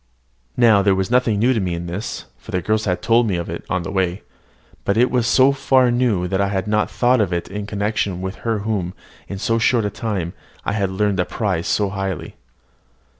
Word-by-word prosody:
Now, 115 -4 +5
there 100 -1 +3
was 95 +3 -2
nothing 125 -4 +3
new 120 +5 +3
to 115 - 0
me 90 -3 -1
in 85 +1 -5
this 90 +6 -5
(for - - -18
the 90 - 0
girls 110 +2 0
had 90 -3 -1
told 115 0 +3
me 100 - 0
of 85 -1 -3
it 85 - -6
on 95 -3 -1
the - - -5
way); 95 -1 -1 0.6
but 100 - 0
it 125 +2 +4
was 125 -3 +1
so 130 +2 +5
far 130 -2 +3
new 120 -7 +1
that 95 +1 0
I 100 - +2
had 95 0 -2
not 105 0 +1
thought 125 -1 +2
of 100 -3 0
it 85 -1 -2
in 100 +1 -5
connection 100 -3 -1
with 95 +1 -5
her 115 -2 -1
whom, 95 -5 -2 0.3
in 100 - -5
so 115 +3 0
short 115 -1 +2
a 105 - -1
time, 95 -5 -3 0.3
I - - 0
had 100 -2 0
learned 100 +1 0
to 90 - +1
prize 95 -7 -2
so 105 -2 +1
highly. 95 -4 -4
100 Hz, 225 wpm, -20 LUFS, 95-115 Hz, 0.6 s, Now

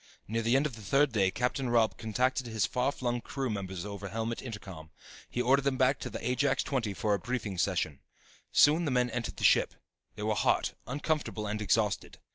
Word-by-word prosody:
Near 115 +2 -1
the 115 +3 +2
end 135 +2 +3
of 140 -7 -3
the 110 - -11
third 135 +7 +3
day 100 -4 +3
Captain 125 +5 -1
Robb 115 -2 +3
contacted 125 +3 0
his 110 -3 0
far 125 +5 0
flung 120 -3 -2
crew 135 -1 -3
members 95 -3 -4
over 100 -1 -6
helmet 115 +3 -3
intercom. 95 -9 -8 0.4
He 125 - -1
ordered 135 +3 +4
them 135 -1 0
back 130 +2 +3
to - - -5
the 115 - -5
Ajax 135 +2 +1
XX 115 -8 -2
for 105 -1 +1
a 100 - +1
briefing 110 -7 -3
session. 85 -7 0 0.5
Soon 155 +4 +5
the - - 0
men 125 -2 +1
entered 120 0 -4
the - - -6
ship. - - +4 0.4
They 105 - -6
were 110 0 +1
hot, 105 - +1
uncomfortable 145 -4 -2
and 105 +1 -3
exhausted. 105 +1 0
115 Hz, 205 wpm, -30 LUFS, 105-130 Hz, 0.5 s, Soon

